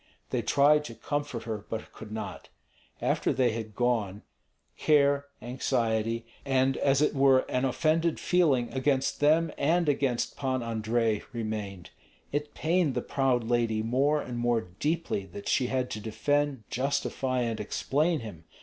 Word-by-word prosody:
They -, -, 0 dB
tried 150 Hz, +2 st, +4 dB
to 115 Hz, -, -8 dB
comfort 145 Hz, -5 st, -3 dB
her, 110 Hz, -3 st, -4 dB
but 110 Hz, -, -5 dB
could 110 Hz, -1 st, -11 dB
not. 110 Hz, 0 st, -6 dB, 0.5 s
After -, -, +1 dB
they 125 Hz, -2 st, +2 dB
had 110 Hz, -2 st, -6 dB
gone, 110 Hz, -5 st, 0 dB, 0.5 s
care, 140 Hz, -1 st, +3 dB, 0.2 s
anxiety, 115 Hz, -2 st, -1 dB, 0.2 s
and 135 Hz, -1 st, +2 dB
as 140 Hz, +1 st, +3 dB
it -, -, +2 dB
were 135 Hz, -2 st, +5 dB
an 125 Hz, +1 st, -1 dB
offended 160 Hz, +5 st, +1 dB
feeling 145 Hz, -10 st, +2 dB
against 135 Hz, 0 st, 0 dB
them 160 Hz, +3 st, +3 dB
and 170 Hz, +3 st, +2 dB
against 135 Hz, -4 st, 0 dB
Pan 130 Hz, -3 st, -1 dB
Andrei 115 Hz, -1 st, 0 dB
remained. 105 Hz, -6 st, -5 dB, 0.4 s
It 145 Hz, +1 st, -3 dB
pained 165 Hz, -3 st, +1 dB
the -, -, -1 dB
proud 130 Hz, -3 st, +1 dB
lady 115 Hz, -2 st, +1 dB
more 135 Hz, +6 st, +2 dB
and 120 Hz, -4 st, -5 dB
more 120 Hz, -1 st, +2 dB
deeply 105 Hz, -, -2 dB
that 100 Hz, +2 st, -9 dB
she 125 Hz, -, +2 dB
had 130 Hz, -1 st, -1 dB
to 105 Hz, -, -4 dB
defend, 140 Hz, +4 st, 0 dB
justify, 130 Hz, -1 st, -1 dB
and 115 Hz, -2 st, -2 dB
explain 150 Hz, +9 st, 0 dB
him. 85 Hz, -8 st, -9 dB
130 Hz, 150 wpm, -28 LUFS, 115-145 Hz, 0.5 s, were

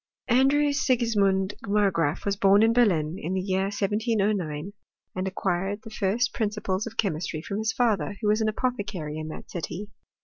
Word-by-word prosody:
Andrew 280 Hz, +4 st, +4 dB
Sigismund 210 Hz, -8 st, +2 dB
Margraaf 190 Hz, -7 st, +1 dB
was 200 Hz, -1 st, +1 dB
bom 200 Hz, +1 st, +5 dB
in 225 Hz, +1 st, +4 dB
Berlin, 180 Hz, -9 st, +2 dB
in 180 Hz, +4 st, -3 dB
the -, -, +1 dB
year 190 Hz, 0 st, 0 dB
1709, 200 Hz, -5 st, -1 dB, 0.4 s
and 185 Hz, +1 st, -2 dB
acquired 195 Hz, +3 st, -2 dB
the 225 Hz, -, -10 dB
first 220 Hz, +4 st, 0 dB
principles 210 Hz, -2 st, -2 dB
of 225 Hz, -, -9 dB
chemistry 160 Hz, -5 st, -1 dB
from 200 Hz, +3 st, -3 dB
his 220 Hz, 0 st, 0 dB
father, 210 Hz, -8 st, 0 dB
who 215 Hz, -, -2 dB
was 215 Hz, +1 st, +3 dB
an 220 Hz, -, +2 dB
apothecary 200 Hz, -10 st, -3 dB
in 155 Hz, -, -5 dB
that 155 Hz, -, -9 dB
city. 190 Hz, +4 st, -5 dB
200 Hz, 165 wpm, -26 LUFS, 185-220 Hz, 0.4 s, bom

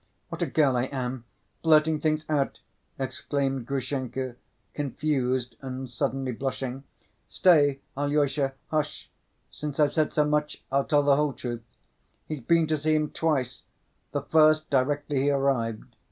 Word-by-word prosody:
What -, -, -6 dB
a -, -, +1 dB
girl 140 Hz, -5 st, +3 dB
I 125 Hz, +1 st, +1 dB
am! 130 Hz, -3 st, -4 dB, 0.4 s
Blurting 155 Hz, -1 st, +4 dB
things 155 Hz, 0 st, 0 dB
out!" 145 Hz, -3 st, 0 dB, 0.4 s
exclaimed 135 Hz, -1 st, -2 dB
Grushenka, 130 Hz, -2 st, -3 dB, 0.4 s
confused 130 Hz, -4 st, -1 dB
and 130 Hz, 0 st, -5 dB
suddenly 130 Hz, +2 st, -1 dB
blushing. 130 Hz, +1 st, -4 dB, 0.4 s
"Stay, 145 Hz, -6 st, +4 dB
Alyosha, 145 Hz, -1 st, +1 dB, 0.2 s
hush! 155 Hz, -1 st, -2 dB, 0.4 s
Since 150 Hz, -1 st, -6 dB
I've 145 Hz, -1 st, +4 dB
said 155 Hz, -2 st, +1 dB
so 150 Hz, -, +2 dB
much 150 Hz, 0 st, -1 dB
I'll 140 Hz, 0 st, +2 dB
tell 145 Hz, -2 st, +3 dB
the 140 Hz, -1 st, +4 dB
whole 150 Hz, -2 st, +1 dB
truth—he's 120 Hz, +5 st, -9 dB
been 165 Hz, +6 st, +3 dB
to 155 Hz, 0 st, 0 dB
see 155 Hz, +1 st, +1 dB
him 150 Hz, -1 st, 0 dB
twice, 135 Hz, -6 st, -1 dB, 0.5 s
the 145 Hz, -, -2 dB
first 155 Hz, 0 st, +4 dB
directly 145 Hz, +1 st, +1 dB
he 140 Hz, -, +2 dB
arrived. 135 Hz, -6 st, 0 dB
140 Hz, 140 wpm, -27 LUFS, 130-150 Hz, 0.5 s, Blurting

